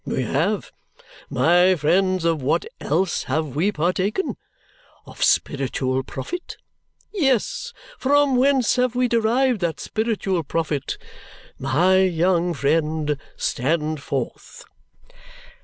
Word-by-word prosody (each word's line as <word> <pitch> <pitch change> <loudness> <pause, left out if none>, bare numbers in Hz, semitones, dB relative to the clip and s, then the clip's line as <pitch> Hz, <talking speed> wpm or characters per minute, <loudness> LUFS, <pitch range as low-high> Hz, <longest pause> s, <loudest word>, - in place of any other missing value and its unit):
We - - -2
have. - - -1 0.6
My 175 +8 +4
friends, 185 +3 +1
of 165 -3 +1
what 135 - +1
else 190 -2 0
have 145 0 -2
we 180 +8 +2
partaken? 185 - -1 0.7
Of - - -5
spiritual 130 -1 +1
profit? 355 - -7 0.6
Yes. 290 - 0 0.3
From 285 0 +3
whence 260 -1 +3
have 250 -1 +1
we 250 0 +2
derived 235 0 +2
that 170 -2 -1
spiritual 215 -5 -1
profit? 155 -2 -2 0.6
My 180 +8 +3
young 175 -1 +1
friend, 150 +1 0 0.2
stand 155 +2 -1
forth!" - - -5
180 Hz, 105 wpm, -22 LUFS, 155-235 Hz, 0.7 s, My